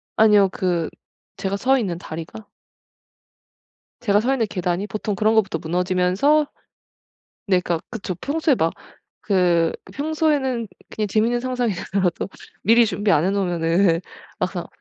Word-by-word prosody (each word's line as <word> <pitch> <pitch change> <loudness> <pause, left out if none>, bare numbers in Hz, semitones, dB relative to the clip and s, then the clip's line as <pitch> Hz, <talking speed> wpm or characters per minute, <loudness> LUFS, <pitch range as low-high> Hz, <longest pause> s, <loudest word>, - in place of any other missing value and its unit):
아니요. 210 -3 +5
그 175 -3 -1 0.5
제가 195 0 -2
서 265 +5 +3
있는 185 -7 -2
다리가. 165 +5 -8 1.5
제가 205 -4 +2
서 250 +5 +1
있는 235 -5 0
계단이 180 +2 -2
보통 210 0 -3
그런 215 +3 +2
것부터 195 -6 +2
무너지면서 180 - +2 1.0
네 185 -2 +3
그러니까 170 -2 -2
그쵸. 205 -5 -4
평소에 305 0 +1
막 165 -6 0 0.5
그 175 -4 +3 0.2
평소에는 285 -6 0 0.3
그냥 215 -1 -1
재밌는 230 +4 +1
상상이더라도 205 -8 -1 0.3
미리 230 +4 +5
준비 205 -1 -1
안 155 -1 +4
해 190 - +2
놓으면은 175 -2 +2 0.4
막상 185 -1 -2
200 Hz, 290 characters per minute, -22 LUFS, 180-235 Hz, 1.5 s, 아니요